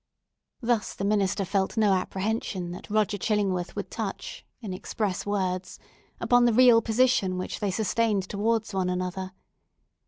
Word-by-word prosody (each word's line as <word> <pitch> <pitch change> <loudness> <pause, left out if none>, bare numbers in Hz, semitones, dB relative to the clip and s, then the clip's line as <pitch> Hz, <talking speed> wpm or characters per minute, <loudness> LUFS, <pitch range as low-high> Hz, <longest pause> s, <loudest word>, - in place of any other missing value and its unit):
Thus 230 -3 0
the 195 - -3
minister 200 -1 +1
felt 195 +3 -1
no 210 -3 +4
apprehension 190 -1 -2
that 180 - -9
Roger 210 -1 +1
Chillingworth 195 -4 0
would - - -5
touch, - - -5 0.2
in 210 -6 -6
express 200 0 -3
words, 185 -2 -2 0.4
upon 245 0 +4
the 240 - +3
real 240 -1 +7
position 220 -5 +2
which 185 - -4
they 205 - 0
sustained 210 0 0
towards 220 +2 -1
one 185 -1 0
another. 185 +1 -3
205 Hz, 145 wpm, -27 LUFS, 185-220 Hz, 0.4 s, real